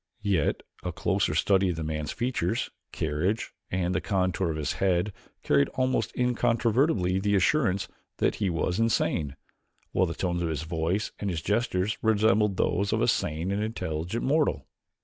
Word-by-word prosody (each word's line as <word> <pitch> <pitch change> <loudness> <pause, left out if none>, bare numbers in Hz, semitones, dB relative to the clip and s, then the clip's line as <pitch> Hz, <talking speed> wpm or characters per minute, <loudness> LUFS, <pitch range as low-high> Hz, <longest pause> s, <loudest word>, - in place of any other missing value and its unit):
Yet 95 -7 +1 0.2
a - - -3
closer - - 0
study 95 -1 +3
of 90 - -1
the 80 - -4
man's 75 -1 -3
features, 120 -3 -1 0.2
carriage, 80 +8 -1 0.2
and 90 -1 0
the 95 - 0
contour 95 -2 0
of 80 - -2
his 75 -3 -1
head 95 +1 +2 0.3
carried 70 -1 +3
almost 130 -4 +1
incontrovertibly 115 - +2
the 100 +1 +1
assurance 100 -2 +2 0.3
that - - +2
he 100 -3 0
was 90 +3 -1
insane, 85 -10 +1 0.6
while 95 - +2
the 85 - -4
tones 85 -1 -1
of 85 - 0
his 80 -1 -2
voice 85 +6 -1
and 100 - -2
his 85 -3 -3
gestures 105 -2 0
resembled 105 -2 +3
those 100 +3 +1
of - - +1
a - - +3
sane 80 +5 0
and 100 +1 0
intelligent 90 -2 -3
mortal. 140 - +1
95 Hz, 165 wpm, -27 LUFS, 85-110 Hz, 0.6 s, study